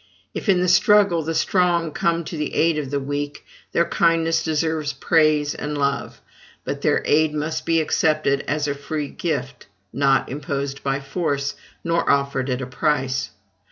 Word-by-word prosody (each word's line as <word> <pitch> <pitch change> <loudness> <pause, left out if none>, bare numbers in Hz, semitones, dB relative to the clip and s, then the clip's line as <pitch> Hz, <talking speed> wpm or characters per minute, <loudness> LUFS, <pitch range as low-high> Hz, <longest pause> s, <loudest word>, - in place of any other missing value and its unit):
If, - - -4
in 185 -2 +4
the 180 - +1
struggle, 195 -1 +4
the 160 +1 -3
strong 175 -3 +1
come 170 +2 0
to 165 - -7
the 150 -1 -3
aid 165 -1 +2
of 140 -3 -4
the 140 0 -1
weak, 145 +1 -4 0.3
their 170 - +2
kindness 165 -1 +2
deserves 160 -1 -1
praise 155 -3 +2
and 150 0 -4
love; 140 0 -2 0.4
but - - -4
their - - +2
aid 155 0 +2
must 155 +1 -3
be 165 0 +3
accepted 155 -3 +1
as 150 0 0
a 145 - 0
free 145 +1 -4
gift, 135 -6 -4 0.3
not 135 -1 +2
imposed 140 0 -4
by 135 0 -1
force, 140 -2 -2 0.3
nor 170 0 0
offered 140 -1 +1
at 130 +1 -1
a - - -3
price. 135 -3 -1
150 Hz, 165 wpm, -22 LUFS, 140-165 Hz, 0.4 s, in